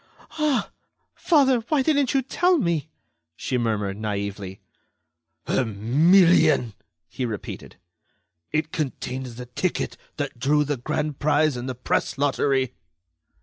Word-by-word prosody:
"Ah! 300 Hz, -4 st, +1 dB, 0.4 s
father, 270 Hz, -7 st, +3 dB
why 295 Hz, -4 st, +2 dB
didn't 285 Hz, -3 st, +2 dB
you 270 Hz, -, +3 dB
tell 355 Hz, +7 st, +2 dB
me?" 170 Hz, -, -1 dB, 0.5 s
she 130 Hz, -, -3 dB
murmured, 105 Hz, -5 st, -1 dB
naively. 100 Hz, -2 st, -4 dB, 0.9 s
"A -, -, +1 dB
million!" 150 Hz, -, +4 dB, 0.3 s
he 130 Hz, -, -5 dB
repeated. 110 Hz, -5 st, -6 dB, 0.8 s
"It 155 Hz, +1 st, -1 dB
contained 130 Hz, -3 st, -4 dB
the 125 Hz, +1 st, -8 dB
ticket 125 Hz, +9 st, -2 dB, 0.2 s
that 145 Hz, -5 st, -4 dB
drew 150 Hz, +4 st, +3 dB
the 145 Hz, -1 st, -2 dB
grand 145 Hz, +4 st, -3 dB
prize 150 Hz, -1 st, +2 dB
in 125 Hz, +1 st, -5 dB
the 130 Hz, -, -4 dB
Press 125 Hz, -, -1 dB
Lottery." 135 Hz, -2 st, +1 dB
140 Hz, 120 wpm, -24 LUFS, 120-170 Hz, 0.9 s, million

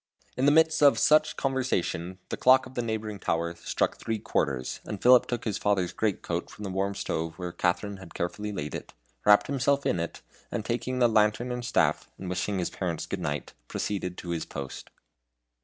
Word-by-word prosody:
In 130 Hz, +3 st, +2 dB
the -, -, +7 dB
midst 160 Hz, +1 st, +4 dB
of 145 Hz, -1 st, +7 dB
such 155 Hz, 0 st, +4 dB
conversation 110 Hz, -9 st, -1 dB
the -, -, -2 dB
clock 130 Hz, +1 st, +5 dB
of 130 Hz, -, -11 dB
the 120 Hz, -, -1 dB
neighboring 110 Hz, -3 st, -3 dB
tower 85 Hz, 0 st, -1 dB
struck 85 Hz, -, -1 dB
three 110 Hz, -1 st, -2 dB
quarters, 70 Hz, -, -1 dB
and 105 Hz, -, -5 dB
Philip 125 Hz, +3 st, +6 dB
took 120 Hz, -, -3 dB
his 105 Hz, -3 st, -1 dB
father's 95 Hz, -4 st, +1 dB
great 105 Hz, -4 st, -1 dB
coat 85 Hz, +1 st, -3 dB
from 105 Hz, -, -10 dB
the 95 Hz, -, -3 dB
warm 100 Hz, +1 st, -1 dB
stove 80 Hz, -4 st, -3 dB
where 90 Hz, -1 st, -4 dB
Katharine 95 Hz, +4 st, -1 dB
had 95 Hz, -3 st, -12 dB
carefully 105 Hz, +5 st, -3 dB
laid 75 Hz, -7 st, -4 dB
it, -, -, -7 dB, 0.3 s
wrapped 105 Hz, 0 st, +7 dB
himself 140 Hz, +1 st, +1 dB
in 90 Hz, -, +1 dB
it, 85 Hz, -, -5 dB, 0.3 s
and 110 Hz, -3 st, -3 dB
taking 120 Hz, +2 st, -2 dB
the 125 Hz, -1 st, +5 dB
lantern 110 Hz, +2 st, +2 dB
and 125 Hz, 0 st, -3 dB
staff, -, -, +1 dB
and 95 Hz, -, -7 dB
wishing 95 Hz, +2 st, -1 dB
his 90 Hz, -, -1 dB
parents 85 Hz, -4 st, -3 dB
good -, -, -4 dB
night, 75 Hz, 0 st, -3 dB
proceeded 90 Hz, -3 st, -3 dB
to 90 Hz, -, -7 dB
his 85 Hz, -1 st, -1 dB
post. 70 Hz, -1 st, -7 dB
105 Hz, 200 wpm, -28 LUFS, 90-125 Hz, 0.3 s, the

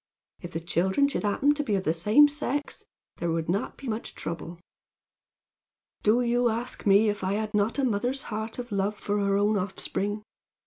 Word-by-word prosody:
If 175 Hz, 0 st, -8 dB
the 165 Hz, -, -2 dB
children 190 Hz, +10 st, +1 dB
should 280 Hz, -, -2 dB
happen 245 Hz, +8 st, +2 dB
to 295 Hz, -, -2 dB
be 215 Hz, -7 st, 0 dB
of 190 Hz, -, -1 dB
the 160 Hz, -, +1 dB
same 210 Hz, -, +6 dB
sex 290 Hz, -1 st, -3 dB, 0.3 s
there 170 Hz, -, -2 dB
would 165 Hz, -1 st, -1 dB
not 195 Hz, +7 st, -1 dB
be 275 Hz, -, -9 dB
much 220 Hz, 0 st, -4 dB
trouble. 170 Hz, +1 st, -6 dB, 1.4 s
"Do 220 Hz, +4 st, +3 dB
you 240 Hz, 0 st, +2 dB
ask 235 Hz, 0 st, -3 dB
me 200 Hz, +2 st, +6 dB
if 205 Hz, -1 st, -1 dB
I 190 Hz, +1 st, 0 dB
had 215 Hz, +1 st, -2 dB
not 210 Hz, +4 st, +1 dB
a 275 Hz, -, +1 dB
mother's 245 Hz, +3 st, 0 dB
heart 220 Hz, 0 st, -5 dB
of 245 Hz, -2 st, -6 dB
love 200 Hz, +1 st, 0 dB
for 205 Hz, 0 st, -1 dB
her 200 Hz, 0 st, +2 dB
own 205 Hz, +1 st, +2 dB
offspring? 200 Hz, +2 st, -2 dB
210 Hz, 190 wpm, -27 LUFS, 195-245 Hz, 1.4 s, same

